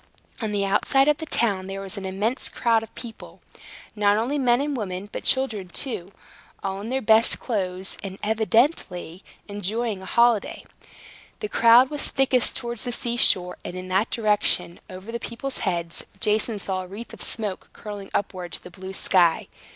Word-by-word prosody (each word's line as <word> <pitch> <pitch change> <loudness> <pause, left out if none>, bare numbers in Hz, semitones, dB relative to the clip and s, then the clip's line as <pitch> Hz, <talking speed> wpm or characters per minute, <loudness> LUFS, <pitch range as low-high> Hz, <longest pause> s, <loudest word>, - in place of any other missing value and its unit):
On 220 -2 -1
the 200 -1 +1
outside 270 +7 +3
of 300 -1 +4
the 320 - -5
town 200 -8 +1
there 195 0 -5
was 195 -1 -4
an 195 -1 -4
immense 205 +7 -1
crowd 230 -2 +2
of 225 - -11
people, 230 -2 -9 0.6
not 205 -1 +3
only 260 +7 0
men 245 -2 +4
and 285 0 -1
women, 195 -4 -4
but - - -5
children 225 -8 0
too, 190 -2 -3 0.5
all 195 0 -2
in 220 - -5
their 265 +1 -1
best 220 +1 +4
clothes, 190 -5 -2
and 195 -1 -6
evidently 220 - +1 0.2
enjoying 205 +1 -2
a - - -9
holiday. 235 -1 +3 0.8
The 425 - -4
crowd 235 +3 +6
was 295 -1 0
thickest 260 -3 +2
towards 240 -3 -4
the 245 - -2
sea 235 0 -1
shore; 180 -6 +3
and 175 - -6
in 185 0 -6
that 190 +4 +2
direction, 210 -6 0
over 185 +4 -8
the 235 - -3
people's 255 +4 -5
heads, 170 -4 -2 0.2
Jason 215 +1 +1
saw 190 -2 -2
a 185 - -8
wreath 205 +6 -9
of - - -7
smoke 210 -4 -2
curling 205 -2 -8
upward 185 -3 -3
to - - -6
the 180 - -11
blue 190 +1 -8
sky. 175 -3 +3
210 Hz, 180 wpm, -25 LUFS, 190-235 Hz, 0.8 s, crowd